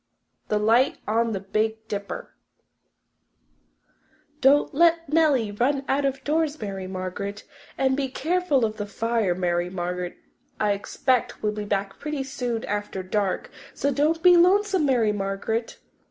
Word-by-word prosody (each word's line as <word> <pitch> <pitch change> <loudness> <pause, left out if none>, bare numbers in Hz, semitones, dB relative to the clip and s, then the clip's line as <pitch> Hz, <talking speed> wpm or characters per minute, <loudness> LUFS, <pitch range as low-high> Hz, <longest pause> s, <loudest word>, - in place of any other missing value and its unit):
The 210 - +1
Light 225 +5 +3
on 230 +2 +1
the 195 - -2
Big 220 +3 -2
Dipper 200 -1 -5 2.1
"Don't 280 +2 +4
let 335 +2 +3
Nellie 285 -10 +3
run 270 +6 0
out 280 +1 +1
of 270 -1 -2
doors, 305 0 0
Mary 195 -3 -5
Margaret, 190 +2 -5 0.3
and 265 0 +2
be 275 -1 -1
careful 300 -1 +1
of 215 0 -4
the 205 -1 -4
fire, 225 -3 0
Mary 175 -1 0
Margaret. 180 0 -4 0.4
I 210 -1 +2
expect 235 +5 -1
we'll 210 - +2
be 210 0 -5
back 200 -1 -2
pretty 300 -2 -3
soon 245 -4 -3
after 205 -2 -3
dark, 195 +1 -1 0.2
so 280 - 0
don't 310 +4 +1
be 360 -1 +8
lonesome, 380 -1 +4
Mary 235 -5 +3
Margaret." 205 +3 -3
225 Hz, 140 wpm, -25 LUFS, 200-280 Hz, 2.1 s, be